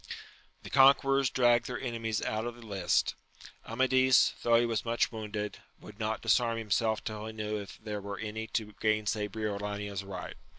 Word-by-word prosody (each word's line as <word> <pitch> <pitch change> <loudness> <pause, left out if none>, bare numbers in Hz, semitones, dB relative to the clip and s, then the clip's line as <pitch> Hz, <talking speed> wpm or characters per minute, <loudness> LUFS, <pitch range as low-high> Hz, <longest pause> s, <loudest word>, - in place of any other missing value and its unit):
The - - -9
conquerors 135 0 +5
dragged 120 -2 +3
their - - -4
enemies 115 -4 -2
out 110 +2 -2
of 120 - -5
the 120 -1 -13
lists. 100 -3 +1 0.5
Amadis, 130 +2 +4
though 120 0 +3
he 120 - +2
was 115 -2 -1
much 115 0 +1
wounded, 105 -2 -5 0.2
would - - -13
not - - -2
disarm 115 -1 +2
himself 110 0 0
till 110 0 -5
he 110 - -6
knew 105 0 -3
if 100 - -10
there 105 -2 -5
were 100 0 -6
any 110 0 -5
to 105 -2 -3
gainsay 110 -1 +1
Briolania's 105 -1 -4
right. 95 -2 -7
110 Hz, 170 wpm, -30 LUFS, 105-120 Hz, 0.5 s, conquerors